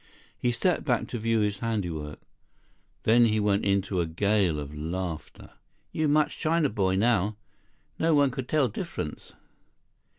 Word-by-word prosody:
He 120 - 0
stepped 175 +9 +1
back 120 -5 0
to 120 - -4
view 115 0 +1
his 105 -1 -1
handiwork. 85 -10 -3 0.8
Then 120 +2 +5
he 110 -1 +2
went 105 -1 +1
into 100 -2 +1
a 85 - -1
gale 95 -1 +1
of 75 0 -7
laughter. 80 -1 -5 0.4
"You 155 -1 0
much 150 +1 +2
China 160 -2 +2
boy 95 -4 0
now. 105 -1 +2 0.6
No 160 -1 +3
one 140 -2 +4
could 125 0 -6
tell 150 -4 +3
difference." 105 - -6
105 Hz, 145 wpm, -27 LUFS, 95-125 Hz, 0.8 s, Then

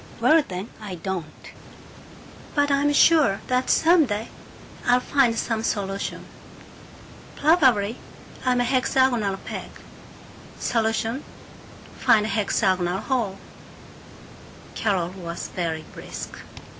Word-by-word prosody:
"Well 320 +1 +5
then, 185 +4 -6
I 200 -4 -6
don't! 175 -3 -6 1.0
But 290 -1 +2
I'm 280 +1 +3
sure 290 -8 +4
that 255 0 0
some 330 -2 +5
day 210 +1 -3 0.5
I'll 245 0 +4
find 250 -3 +2
some 225 0 -1
solution. 200 -3 -3 1.1
Probably 260 - +3 0.5
I'm 250 -1 +2
a - - +3
hexagonal 250 -5 +1
peg. - - -7 0.9
Solution: 225 +3 -1 0.8
find 215 -1 +4
the - - -3
hexagonal 190 -3 0
hole." 225 -7 -1 1.4
Carol 190 -5 0
was 175 -2 -7
very 160 -3 -3
brisk. - - -8
225 Hz, 100 wpm, -24 LUFS, 195-260 Hz, 1.4 s, Well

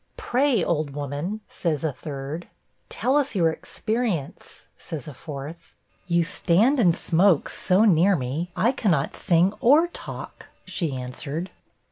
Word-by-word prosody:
'Pray, 270 - +1
old 150 -4 -1
woman,' 145 +9 -4
says 155 -4 -2
a 160 - +1
third. 145 +4 -6 0.4
'Tell 265 +3 +1
us 280 -5 0
your 165 -4 +3
experience,' 215 - -4
says 155 -4 -7
a 150 - -7
fourth. 150 +4 -9 0.3
'You 170 -1 +3
stand 215 - +2
and 175 -7 +4
smoke 175 -2 +3
so 190 +4 +3
near 190 0 +5
me, 150 +5 -3
I 235 - +3
cannot 180 - 0
sing 175 +3 +2
or 305 +8 +5
talk,' - - -8 0.2
she 160 -7 -2
answered. 140 +7 -5
170 Hz, 135 wpm, -24 LUFS, 150-215 Hz, 0.4 s, near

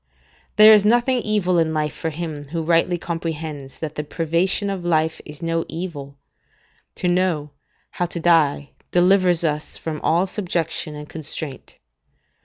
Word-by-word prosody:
There 215 +1 +9
is 210 -2 +6
nothing 240 +4 +3
evil 205 -6 +1
in 160 -1 +1
life 150 -1 -1
for 160 - -3
him 155 -2 -6
who 165 +3 -3
rightly 170 +2 +2
comprehends 160 -5 -5
that 155 -2 -5
the 150 - -4
privation 170 +6 0
of 190 -3 -4
life 160 -2 0
is 150 +2 -10
no 165 0 0
evil: 145 -5 -6 0.8
to - - -2
know, 175 -5 0 0.4
how 175 - -2
to 170 - -6
die 155 -4 +2 0.2
delivers 180 -1 +4
us 150 -1 -2
from 155 -2 -5
all 170 +4 +2
subjection 170 -5 -2
and 150 0 -8
constraint. 155 -2 -6
165 Hz, 150 wpm, -21 LUFS, 155-180 Hz, 0.8 s, There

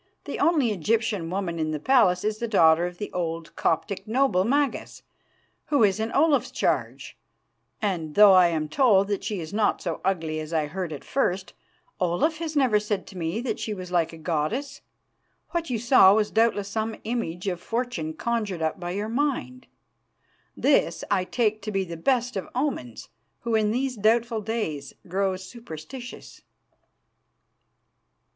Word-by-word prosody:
The - - -5
only 295 -9 +3
Egyptian 210 -1 0
woman 180 -2 -3
in 155 -1 -1
the 155 -1 -2
palace 180 - +3
is 215 0 -1
the 235 - -2
daughter 170 -5 +4
of 180 0 -9
the 210 - -5
old 165 -2 -4
Coptic 195 +6 -1
noble, 235 -5 +2
Magas, 280 +4 -1 0.6
who 285 -6 +2
is 200 0 +3
in 220 +1 -2
Olaf's 295 0 +3
charge, - - -2 0.6
and 165 -7 -2
though 205 -1 +8
I 185 -1 +7
am 160 -2 -1
told 200 - +3
that 205 - -2
she 205 -3 -3
is 160 +3 -7
not 210 0 +1
so 170 -3 -4
ugly 165 -5 -1
as 155 +1 -6
I 155 -2 +1
heard 175 +2 -4
at 145 - -7
first, 190 -8 -1 0.5
Olaf 185 - +1
has 320 -2 -4
never 255 -7 +3
said 210 -2 -3
to 190 - -11
me 170 +7 -2
that 250 - -3
she 215 - -3
was 180 -2 -8
like 170 -3 +1
a 165 - -10
goddess. 175 - -2 0.7
What 335 -3 -2
you 245 - 0
saw 215 -4 +6
was 215 -1 +1
doubtless 220 -3 +2
some 220 +1 -2
image 210 -6 -3
of 180 -2 -2
Fortune 225 -9 -3
conjured 210 -6 -2
up 160 +4 -1
by 175 -1 -5
your 205 +2 -2
mind. 255 0 -2 0.9
This - - +2
I 185 - +2
take 215 0 0
to 215 +2 -4
be 195 -1 0
the 170 -2 -7
best 245 +7 0
of 190 - -4
omens, 250 - -3 0.3
who 235 -1 -2
in 215 -1 +3
these 250 +2 -1
doubtful 225 +2 +2
days 200 -11 -4
grow 190 +1 0
superstitious. 235 - -10
205 Hz, 165 wpm, -25 LUFS, 175-235 Hz, 0.9 s, though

